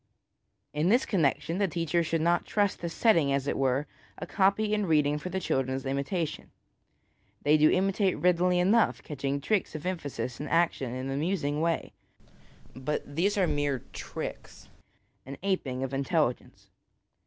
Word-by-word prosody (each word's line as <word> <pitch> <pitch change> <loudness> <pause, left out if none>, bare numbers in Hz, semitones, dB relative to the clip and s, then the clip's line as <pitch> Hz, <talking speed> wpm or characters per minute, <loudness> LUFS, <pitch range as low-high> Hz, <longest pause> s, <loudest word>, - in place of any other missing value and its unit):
In 150 +4 +1
this 240 +5 +4
connecton 165 - 0
the 200 - +2
teacher 170 0 0
should 165 0 -1
not 170 +2 +2
trust 205 -2 +1
to 170 - -3
setting, 165 -6 +3
as 135 -1 0
it - - -1
were, 135 +1 +1 0.3
a - - -5
copy 205 +2 +2
in 210 -2 0
reading 150 -2 +2
for 180 - -6
the 190 +1 -2
children's 135 -5 -1
imitation. 145 +4 -2 0.9
They 150 +1 +5
do 155 0 +5
imitate 195 +1 +1
readily 180 0 +3
enough, 200 +6 +3
catching 140 -1 -3
tricks 195 +3 -1
of 155 - -6
emphasis 145 -9 -4
and 145 0 -5
action 165 -6 +1
in 130 +1 -4
an 135 - -3
amusing 150 -1 -1
way; 165 0 -1 0.8
but 140 +1 -4
these 200 +6 +1
are 190 - +4
mere 145 -5 -1
tricks, - - -7 0.6
an 140 - -7
aping 135 -10 -1
of 135 +1 -4
intelligence. 140 -1 -1
160 Hz, 155 wpm, -28 LUFS, 140-185 Hz, 0.9 s, They